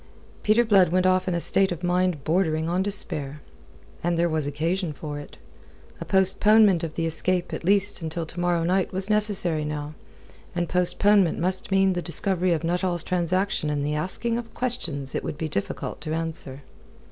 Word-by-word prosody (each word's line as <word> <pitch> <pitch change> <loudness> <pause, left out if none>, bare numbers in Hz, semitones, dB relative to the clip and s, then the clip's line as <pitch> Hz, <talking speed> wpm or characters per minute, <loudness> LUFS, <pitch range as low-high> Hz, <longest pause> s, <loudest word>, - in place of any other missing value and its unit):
Peter 220 +3 +3
Blood 195 -5 +5
went 185 +2 +1
off 185 0 +2
in 180 - 0
a - - 0
state 190 +2 +2
of 175 0 -5
mind 180 -4 0
bordering 160 -1 0
on 175 +2 0
despair. 155 -8 -4 0.6
And 170 0 0
there 170 +1 +2
was 155 -2 -1
occasion 165 +4 -2
for 145 0 -6
it. 145 - -12 0.6
A - - -6
postponement 195 0 +4
of 160 -2 -5
the 165 - -1
escape 175 +2 -1
at - - -5
least 200 +1 +2
until 160 +1 -3
to 165 +2 -9
morrow 175 -1 +1
night 185 +2 +1
was 190 +2 +1
necessary 200 -7 +1
now, 150 0 -4 0.6
and 175 -1 -1
postponement 185 +1 +3
must 185 +6 -1
mean 195 -1 +3
the 175 - -2
discovery 180 +2 0
of 165 -1 0
Nuttall's 175 0 -1
transaction 180 -2 -1
and 145 -1 -1
the 150 - -1
asking 210 +9 -1
of 230 -1 -10
questions 165 - -2
it - - -2
would - - -5
be 160 - -3
difficult 100 -10 -4
to 155 0 -3
answer. 160 -4 -5
175 Hz, 180 wpm, -25 LUFS, 160-190 Hz, 0.6 s, Blood